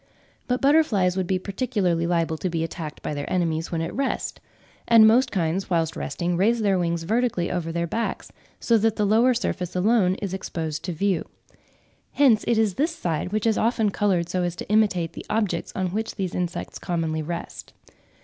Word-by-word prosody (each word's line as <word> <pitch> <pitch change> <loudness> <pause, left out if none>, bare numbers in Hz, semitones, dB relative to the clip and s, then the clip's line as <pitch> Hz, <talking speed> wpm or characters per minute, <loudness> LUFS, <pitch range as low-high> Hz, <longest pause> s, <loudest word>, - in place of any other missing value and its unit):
But 250 0 0
butterflies 245 - +3
would 190 -2 -1
be 190 - +1
particularly 185 -4 -1
liable 165 -2 0
to 185 - -1
be 165 -1 -1
attacked 165 -2 -6
by - - -3
their 145 -1 -5
enemies 165 -3 -1
when 165 -2 -1
at - - -4
rest; 270 0 -2 0.5
and 230 -2 +7
most 250 +4 +4
kinds 180 0 -1
whilst 165 -2 0
resting 175 0 -2
raise 225 +4 +2
their 195 -3 +2
wings 170 -1 -1
vertically 220 -2 0
over 170 -2 -2
their 170 +1 -1
backs, 225 +7 -3 0.3
so 230 -2 +3
that 220 0 +1
the 210 - +1
lower 230 +5 +4
surface 185 -7 -3
alone 190 -1 +3
is 195 -2 -5
exposed 160 -5 -4
to 180 - -2
view. 180 +1 0 0.9
Hence 250 -7 +4
it 235 - +2
is 220 -3 +2
this 315 - 0
side 170 - -2
which 215 +1 -1
is 225 -1 +2
often 220 -2 +1
coloured 190 -5 +1
so 180 +1 -1
as 175 -1 -2
to - - -8
imitate 195 -6 +2
the - - -8
objects 210 -6 -1
on 185 -1 -1
which 220 +5 -3
these 190 -3 -3
insects 175 -1 -4
commonly 160 -2 -2
rest. 170 +2 -6
185 Hz, 190 wpm, -24 LUFS, 170-220 Hz, 0.9 s, and